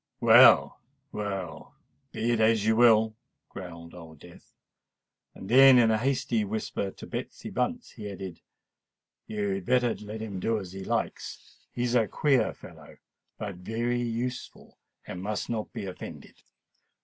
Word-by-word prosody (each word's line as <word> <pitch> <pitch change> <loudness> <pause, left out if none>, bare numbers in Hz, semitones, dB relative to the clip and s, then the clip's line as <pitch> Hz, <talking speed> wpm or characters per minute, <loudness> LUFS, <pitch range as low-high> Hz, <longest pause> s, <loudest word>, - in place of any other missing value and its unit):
"Well, - - +7 0.3
well—be 100 +3 -5
it 115 - +1
as 110 -1 +3
you 110 0 +3
will," 110 -2 +5 0.3
growled 85 -3 -10
Old 80 -3 -12
Death: 85 +4 -16 0.8
then, 130 +6 +6
in 115 -2 +5
a 110 - +1
hasty 120 -3 0
whisper 105 -1 -3
to - - -11
Betsy - - -6
Bunce, - - -2
he 105 -1 -8
added, 95 -3 -8 0.9
"You 105 -2 -2
had 95 -2 -3
better 125 -2 +2
let 105 +1 -8
him 100 -4 -5
do 115 +4 0
as 95 -4 -7
he 95 0 -7
likes. - - -5
He 120 - -3
is 120 -1 0
a 115 -3 +3
queer 135 -4 +2
fellow, - - -14 0.4
but 100 -4 -6
very 115 +6 -2
useful—and 120 -5 -6
must 105 +3 -3
not 110 -2 -3
be - - -6
offended." 95 - -10
110 Hz, 140 wpm, -27 LUFS, 95-120 Hz, 0.9 s, Well